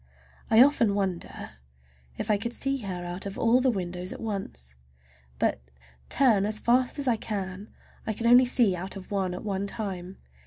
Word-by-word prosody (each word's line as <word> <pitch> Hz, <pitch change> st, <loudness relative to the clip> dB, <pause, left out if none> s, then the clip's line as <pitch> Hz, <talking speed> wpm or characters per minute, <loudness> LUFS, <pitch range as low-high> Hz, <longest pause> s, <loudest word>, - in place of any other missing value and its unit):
I 225 Hz, +2 st, +8 dB
often 235 Hz, -7 st, +3 dB
wonder 190 Hz, -4 st, -3 dB, 0.7 s
if 215 Hz, -, -1 dB
I 210 Hz, -, +3 dB
could 235 Hz, +3 st, -4 dB
see 275 Hz, +2 st, -1 dB
her 185 Hz, -5 st, -5 dB
out 175 Hz, +3 st, -5 dB
of 195 Hz, -, -7 dB
all 235 Hz, +2 st, +3 dB
the 260 Hz, -, +3 dB
windows 180 Hz, -4 st, -3 dB
at -, -, -7 dB
once. 195 Hz, -, -5 dB, 0.6 s
But, -, -, 0 dB, 0.5 s
turn 235 Hz, -7 st, +4 dB
as 215 Hz, 0 st, 0 dB
fast 250 Hz, +5 st, +2 dB
as 280 Hz, -2 st, -3 dB
I 235 Hz, -3 st, +3 dB
can, 200 Hz, -1 st, -5 dB, 0.4 s
I 220 Hz, -, 0 dB
can 230 Hz, +2 st, -5 dB
only 245 Hz, +2 st, +7 dB
see 240 Hz, -6 st, +3 dB
out 185 Hz, +3 st, -6 dB
of 195 Hz, 0 st, -10 dB
one 190 Hz, -3 st, -1 dB
at -, -, -7 dB
one 200 Hz, -1 st, -2 dB
time. 195 Hz, -4 st, -5 dB
205 Hz, 185 wpm, -27 LUFS, 185-235 Hz, 0.7 s, I